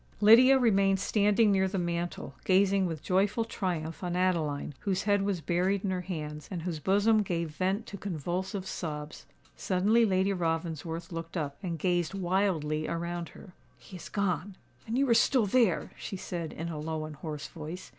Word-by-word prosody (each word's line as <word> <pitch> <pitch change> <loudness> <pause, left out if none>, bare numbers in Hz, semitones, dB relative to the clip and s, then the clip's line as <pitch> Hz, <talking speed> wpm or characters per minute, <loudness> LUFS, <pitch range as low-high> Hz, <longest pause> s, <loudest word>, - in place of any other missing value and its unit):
Lydia 240 +6 +8
remained 195 -5 +3
standing 210 +2 +3
near 190 -1 +3
the 195 +1 -3
mantel, 175 -1 -3
gazing 195 0 +3
with 160 -3 -5
joyful 205 +5 +1
triumph 175 -6 -3
on 175 -1 -2
Adeline, 165 -6 0
whose 190 -2 -1
head 205 -1 +2
was 195 -3 -1
buried 185 +4 0
in 195 - 0
her 185 -1 -1
hands, 150 -5 -6
and 175 -4 -5
whose 170 -3 -3
bosom 205 +6 +3
gave 170 -4 -2
vent 190 +7 -1
to 200 - -8
convulsive 185 +2 -3
sobs. 150 -5 -6 0.3
Suddenly 205 +5 +2
Lady 190 0 +2
Ravensworth 165 -1 -3
looked 165 +1 -5
up, 145 -3 -3
and 175 -4 -3
gazed 175 +1 0
wildly 175 -5 0
around 170 0 -3
her. 180 - -13 0.2
"He 185 - -13
is - - -10
gone—and 200 - -3
you 275 +1 +3
are 235 - +5
still 235 0 +4
there!" 215 -3 +2
she 195 - -5
said, 170 -3 -5
in 165 +2 -5
a 155 -2 -5
low 155 0 -3
and 155 -2 -9
hoarse 150 -1 -6
voice. 165 +3 -8
180 Hz, 175 wpm, -29 LUFS, 165-200 Hz, 0.3 s, Lydia